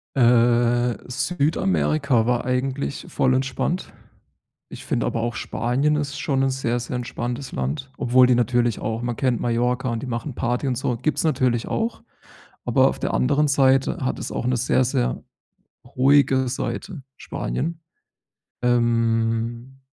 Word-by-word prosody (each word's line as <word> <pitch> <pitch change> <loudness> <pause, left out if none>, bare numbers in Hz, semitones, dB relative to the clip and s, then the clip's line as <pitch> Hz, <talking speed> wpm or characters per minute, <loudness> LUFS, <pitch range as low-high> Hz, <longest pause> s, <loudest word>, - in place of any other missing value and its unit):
Äh, 120 -1 +3
Südamerika 150 -4 +1
war 120 0 +1
eigentlich 130 +2 -2
voll 130 - +1
entspannt. 135 +7 -2 0.8
Ich - - -10
finde - - -1
aber 115 - -2
auch 120 0 -2
Spanien 135 +6 0
ist 145 -1 -3
schon 135 -2 0
'n 135 - +2
sehr, 120 -2 -1
sehr 120 +2 -5
entspanntes 125 +2 -4
Land, 70 - -3
obwohl 125 0 +4
die 125 - +4
natürlich 120 0 +1
auch 110 +1 -3
man 120 -1 -2
kennt 125 -3 +1
Mallorca 125 +2 0
und 115 -1 -3
die - - -5
machen 120 +2 -4
Party 125 +3 -1
und 125 - -1
so, 125 -1 -1
gibt's 155 +7 -1
natürlich 125 -7 +1
auch. 225 +1 -2 0.6
Aber - - +4
auf - - -4
der - - -2
anderen 140 - +2
Seite 135 -1 +3
hat - - -1
es - - -5
auch - - -3
'ne 125 0 +1
sehr, 130 +2 +2
sehr - - -1 0.7
ruhige 135 -1 +4
Seite, 150 +4 -4
Spanien. 160 - -4 0.8
Ähm 115 +1 0
125 Hz, 145 wpm, -23 LUFS, 120-135 Hz, 0.8 s, obwohl